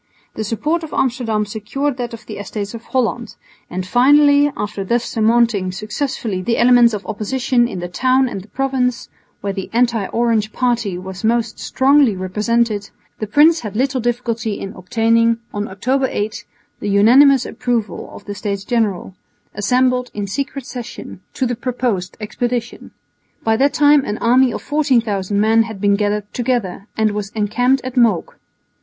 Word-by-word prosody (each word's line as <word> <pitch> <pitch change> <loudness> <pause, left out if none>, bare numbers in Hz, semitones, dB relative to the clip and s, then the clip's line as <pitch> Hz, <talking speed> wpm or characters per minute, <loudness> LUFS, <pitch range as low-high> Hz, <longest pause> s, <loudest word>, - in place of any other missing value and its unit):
The 220 - -4
support 300 +10 -1
of 320 - -8
Amsterdam 230 -4 0
secured 230 +7 -3
that 245 -2 -4
of 230 0 -10
the 215 - -8
Estates 205 0 -5
of 230 0 -9
Holland; 240 -2 -2 0.3
and 180 +1 -4
finally, 285 +6 +5
after 205 -1 -3
thus 235 +5 0
surmounting 225 -4 +2
successfully 215 0 -3
the 230 +5 0
elements 240 -2 +5
of 205 - -7
opposition 240 +3 0
in 185 -7 -6
the 175 - -4
town 260 +7 +2
and 200 -6 -5
the 195 - -16
province, 255 0 -1 0.3
where 200 -1 -2
the 195 -1 -5
anti 235 -4 +1
Orange 225 -2 0
party 235 -7 0
was 185 0 -8
most 230 +1 0
strongly 270 -4 +3
represented, 210 +3 -1 0.3
the 215 - -3
prince 310 +9 +5
had 210 -6 -7
little 260 +2 0
difficulty 230 -3 -2
in 195 +1 -6
obtaining, 230 +4 +2 0.2
on 205 0 -3
October 260 +8 0
8, 210 +1 -4 0.3
the 205 - -3
unanimous 255 +7 +5
approval 230 -8 -3
of - - -12
the 205 - -5
States 200 0 -4
General, 210 -6 -1 0.4
assembled 250 +4 +1
in 205 -1 -2
secret 275 +5 -4
session, 240 -7 -8
to 260 - 0
the 245 0 -1
proposed 235 -7 -2
expedition. 235 +2 -4 0.5
By 225 0 +2
that 280 +3 +2
time 290 -1 +5
an 210 - -3
army 250 +2 +3
of - - -6
14,000 225 -9 0
men 220 +2 +4
had 220 -3 -4
been 200 0 +3
gathered 210 0 -2
together 235 -6 -2
and 220 -1 +2
was 205 -1 -4
encamped 245 +5 +1
at 255 0 -6
Mook. 230 -8 +1
230 Hz, 160 wpm, -18 LUFS, 205-250 Hz, 0.5 s, finally